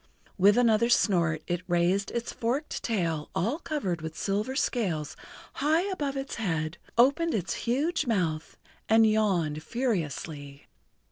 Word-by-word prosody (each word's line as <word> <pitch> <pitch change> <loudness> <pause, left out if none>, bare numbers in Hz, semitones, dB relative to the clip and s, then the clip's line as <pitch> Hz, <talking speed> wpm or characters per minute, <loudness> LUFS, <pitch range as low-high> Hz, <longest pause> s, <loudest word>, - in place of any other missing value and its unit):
With 205 +3 +5
another 235 -1 +4
snort 170 -9 +2
it 175 0 -2
raised 175 +3 +1
its 235 0 -4
forked 255 +7 -2
tail 165 -9 -1
all 230 - 0
covered 195 - -3
with 160 0 -6
silver 210 +7 -1
scales 185 - -1 0.4
high 315 +5 +2
above 285 -6 -2
its 270 0 -5
head, 165 -7 -2 0.2
opened 285 +7 +4
its 175 -5 -2 0.2
huge 300 +6 0
mouth 165 -8 -1 0.3
and 225 0 +6
yawned 190 -9 +1
furiously. 155 - -3
205 Hz, 130 wpm, -28 LUFS, 165-245 Hz, 0.4 s, and